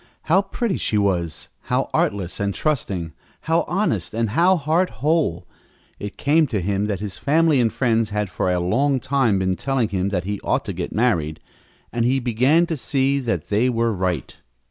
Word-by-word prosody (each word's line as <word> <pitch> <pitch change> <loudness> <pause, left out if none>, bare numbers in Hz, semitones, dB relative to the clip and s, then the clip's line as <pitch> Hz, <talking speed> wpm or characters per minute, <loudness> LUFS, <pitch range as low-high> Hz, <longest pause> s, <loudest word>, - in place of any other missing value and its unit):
How 185 +5 +3
pretty 200 +1 -2
she 105 - 0
was, 90 -5 -1 0.2
how - - 0
artless 95 -4 -1
and 100 -1 -1
trusting, 95 - -2 0.3
how 165 +1 +1
honest 115 - -1
and 115 -2 0
how 180 - +4
heart 165 +4 +1 0.2
whole! 150 - +1 0.5
It 105 0 -7
came 155 +2 +3
to 110 -5 -1
him 100 +3 -1
that 100 -2 -3
his 100 -3 -6
family 155 -1 +3
and 115 -2 +2
friends 115 -4 +1
had 105 -1 -1
for 90 - 0
a 90 - +1
long 130 +10 +1
time 130 -6 +1
been 95 -1 0
telling 130 -1 -1
him 95 0 -1
that 90 -3 -1
he 100 +1 -3
ought 135 - 0
to 100 - -4
get 90 0 -4
married, 85 -10 0 0.5
and 120 -1 0
he 130 +3 +2
began 130 +7 +3
to 165 -2 -3
see 135 +1 +1
that 120 -4 -3
they 110 +5 +2
were 115 -1 +1
right. 90 -3 -2
115 Hz, 190 wpm, -22 LUFS, 100-140 Hz, 0.5 s, how